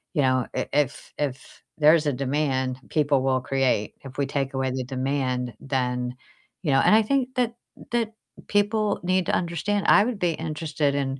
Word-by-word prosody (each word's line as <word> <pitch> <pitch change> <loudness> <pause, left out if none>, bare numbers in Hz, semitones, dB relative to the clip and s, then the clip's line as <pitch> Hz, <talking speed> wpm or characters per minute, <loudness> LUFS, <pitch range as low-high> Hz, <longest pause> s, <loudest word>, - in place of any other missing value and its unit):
you 145 - +3
know, 130 -1 +2
i - - -1
if 145 -3 -1
if 135 -3 -4 0.2
there's 155 0 +5
a 145 - +2
demand, 130 -1 -1
people 145 -3 +2
will 130 -1 +1
create, 130 -5 0
if 135 -1 -10
we 140 - +1
take 135 0 -2
away 130 -1 -1
the 130 0 -2
demand, 130 -1 -2
then, 125 -2 -2 0.5
you 150 - +1
know 135 - +5
and 210 - +5
I 220 - +5
think 260 +2 0
that 245 -2 +1 0.4
that 230 -2 0 0.3
people 205 0 +1
need 185 0 +1
to - - 0
understand, 180 +4 -1
I 205 - +7
would 240 -3 -2
be 175 -1 +2
interested 155 -2 -2
in 135 -1 -2
140 Hz, 180 wpm, -25 LUFS, 130-175 Hz, 0.5 s, I